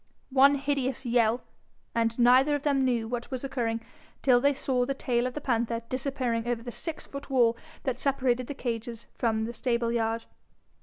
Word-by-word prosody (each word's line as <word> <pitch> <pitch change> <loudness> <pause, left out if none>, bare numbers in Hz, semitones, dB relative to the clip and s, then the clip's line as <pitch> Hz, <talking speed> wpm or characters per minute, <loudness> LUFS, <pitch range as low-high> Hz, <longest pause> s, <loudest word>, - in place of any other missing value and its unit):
One 275 +2 +6
hideous 275 -2 -1
yell 235 0 +2 0.5
and 230 0 +1
neither 255 +4 +5
of 290 - -4
them 280 -2 +2
knew 240 -3 +1
what 235 0 -4
was 260 -1 -4
occurring 235 -4 -1 0.4
till 245 -2 +5
they 280 +1 +3
saw 255 -2 0
the 275 +2 -2
tail 245 -2 0
of 255 - -6
the 295 - -4
panther 235 -3 0
disappearing 255 -3 -1
over 240 -1 -1
the 240 - -6
six 320 +5 -5
foot 280 0 -8
wall 240 -3 +4 0.3
that 260 -3 -2
separated 255 -3 +1
the 285 - -5
cages 235 -2 -4
from 220 -2 0
the 235 - -5
stableyard. 235 -1 0
245 Hz, 175 wpm, -28 LUFS, 235-270 Hz, 0.5 s, One